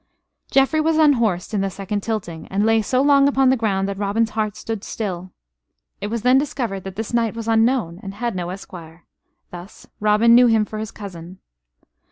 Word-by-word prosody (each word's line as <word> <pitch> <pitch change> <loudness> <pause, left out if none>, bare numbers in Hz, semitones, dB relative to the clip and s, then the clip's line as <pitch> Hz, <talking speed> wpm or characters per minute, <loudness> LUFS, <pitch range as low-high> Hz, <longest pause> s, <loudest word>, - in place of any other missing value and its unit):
Geoffrey 275 +3 +3
was 320 0 +1
unhorsed 235 - +2
in 205 - 0
the 195 - -1
second 200 +2 -4
tilting; 195 -7 -5
and 200 +2 0
lay 225 0 +3
so 255 +5 +1
long 280 -1 +5
upon 270 -2 +3
the - - +3
ground 200 -5 -1
that 200 0 -5
Robin's 210 +2 0
heart 215 -2 -2
stood 220 -3 -5
still. 185 -4 -5 0.7
It 205 - -2
was 225 +1 -4
then 255 +2 +5
discovered 235 -9 -3
that 190 -1 -7
this 220 +2 -5
knight 230 -2 +1
was 230 -1 -6
unknown 225 -6 +1
and 195 -2 -8
had 235 -1 -3
no 175 -1 -3
esquire. 175 -3 -10 0.5
Thus 180 +3 -11
Robin 215 +2 +4
knew 245 +1 +7
him 220 -2 +3
for 215 0 -7
his 215 0 -4
cousin. 185 -3 -10
215 Hz, 195 wpm, -21 LUFS, 195-235 Hz, 0.7 s, knew